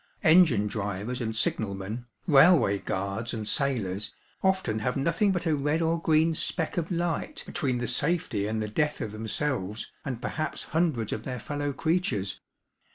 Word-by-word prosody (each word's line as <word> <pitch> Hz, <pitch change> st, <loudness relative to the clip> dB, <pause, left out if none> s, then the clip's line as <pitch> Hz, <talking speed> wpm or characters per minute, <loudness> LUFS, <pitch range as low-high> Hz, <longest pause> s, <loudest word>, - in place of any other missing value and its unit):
Engine 160 Hz, -, +6 dB
drivers 105 Hz, +3 st, -3 dB
and 110 Hz, -1 st, -2 dB
signal 110 Hz, -2 st, 0 dB
men, 105 Hz, +6 st, -6 dB, 0.2 s
railway 145 Hz, -, +6 dB
guards 100 Hz, +6 st, -3 dB
and 110 Hz, -2 st, -4 dB
sailors, 105 Hz, -8 st, 0 dB, 0.3 s
often 190 Hz, -, +1 dB
have 125 Hz, +4 st, -1 dB
nothing 165 Hz, +8 st, +2 dB
but 175 Hz, -2 st, -1 dB
a 160 Hz, -2 st, +2 dB
red 145 Hz, +3 st, 0 dB
or 165 Hz, 0 st, +1 dB
green 160 Hz, 0 st, +3 dB
speck 160 Hz, +1 st, 0 dB
of 170 Hz, -1 st, -1 dB
light 175 Hz, -, -2 dB
between 135 Hz, -7 st, -1 dB
the 120 Hz, 0 st, -2 dB
safety 140 Hz, -, 0 dB
and 110 Hz, 0 st, -1 dB
the -, -, -3 dB
death 150 Hz, +8 st, 0 dB
of 105 Hz, -, -3 dB
themselves 110 Hz, -1 st, -2 dB
and 125 Hz, -4 st, -4 dB
perhaps 155 Hz, +5 st, -3 dB
hundreds 155 Hz, -10 st, 0 dB
of 110 Hz, -, -4 dB
their 125 Hz, -1 st, -4 dB
fellow 145 Hz, +4 st, -3 dB
creatures. 140 Hz, -, -1 dB
130 Hz, 160 wpm, -28 LUFS, 110-160 Hz, 0.3 s, Engine